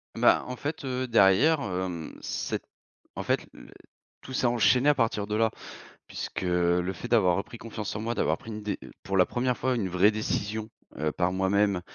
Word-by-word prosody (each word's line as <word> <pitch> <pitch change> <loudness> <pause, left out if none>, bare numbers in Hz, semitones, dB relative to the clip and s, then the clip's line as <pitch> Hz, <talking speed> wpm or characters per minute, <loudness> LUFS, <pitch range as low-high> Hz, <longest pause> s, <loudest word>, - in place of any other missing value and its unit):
Bah, - - +4
en 125 - -4
fait, 145 +2 -5
heu, 130 0 -2
derrière, 115 +8 +5
hem, 90 - -4
c'est - - -3 0.5
en - - -4
fait - - +1
l - - -14 0.5
tout - - -11
s'est 130 - +2
enchaîné 120 +3 +3
à 145 - +4
partir 115 -5 0
de 105 - -2
là, 110 0 +2 0.6
puisque - - -5
le 90 0 +1
fait 95 +6 -7
d'avoir 100 -7 +4
repris 100 +4 -5
confiance 110 -3 -5
en - - -3
moi, 115 +1 -1
d'avoir - - +1
pris 115 - -10
une 105 -1 -6
dé 105 0 -3 0.2
pour 95 - -2
la 90 - +6
1re 125 0 0
fois 130 +2 0
une 105 -6 -1
vraie 90 +3 +4
décision, 110 0 -2 0.3
heu, 75 +1 0
par 90 +2 0
moi-même, 95 0 +2
105 Hz, 195 wpm, -27 LUFS, 95-120 Hz, 0.6 s, la